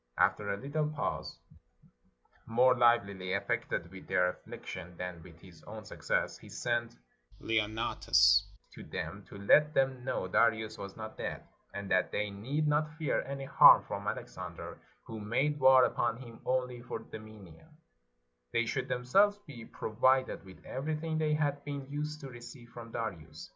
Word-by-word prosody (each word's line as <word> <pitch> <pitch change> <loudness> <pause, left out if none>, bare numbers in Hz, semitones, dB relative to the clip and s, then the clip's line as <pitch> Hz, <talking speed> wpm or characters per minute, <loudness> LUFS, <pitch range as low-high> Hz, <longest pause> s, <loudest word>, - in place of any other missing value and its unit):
After 100 -1 +2
a 100 - -2
little 150 +5 -2
pause, 150 -1 -3 1.1
more 125 +3 +5
livelily 100 -6 +2
affected 85 - -2
with 95 -1 -11
their 90 -1 +3
affliction 90 -1 -8
than 90 -2 -5
with 85 -1 -15
his 85 -3 -16
own 110 0 -9
success, - - -2
he - - -14
sent 120 -1 -2 0.4
Leonnatus 105 -2 +3 0.3
to - - -10
them, - - -6
to - - -11
let 150 +10 +4
them 135 -2 +1
know 125 -7 -2
Darius 110 +2 +2
was 100 0 -8
not 110 0 -8
dead, - - -4 0.3
and 100 -1 -5
that 90 0 +2
they 105 -1 -1
need 135 +10 -2
not 150 +1 0
fear 155 -2 0
any 135 0 -5
harm 135 - +8
from - - -5
Alexander, - - -6 0.2
who 110 -1 -8
made 135 +8 0
war 130 -1 +7
upon 115 -1 0
him 120 -2 -12
only 125 -1 -1
for 125 - -5
dominion; 110 - -12 0.8
they - - +2
should - - -2
themselves 195 +12 +3
be 120 -7 -10
pro 110 - -6
vided 130 +3 +2
with 95 -1 -15
everything 155 +3 -3
they 155 -1 +2
had 145 -2 -1
been 140 -2 -5
used 150 +1 -3
to 140 - -7
receive 120 0 -11
from 115 -1 -10
Darius. 85 -10 -6
120 Hz, 160 wpm, -32 LUFS, 100-140 Hz, 1.1 s, harm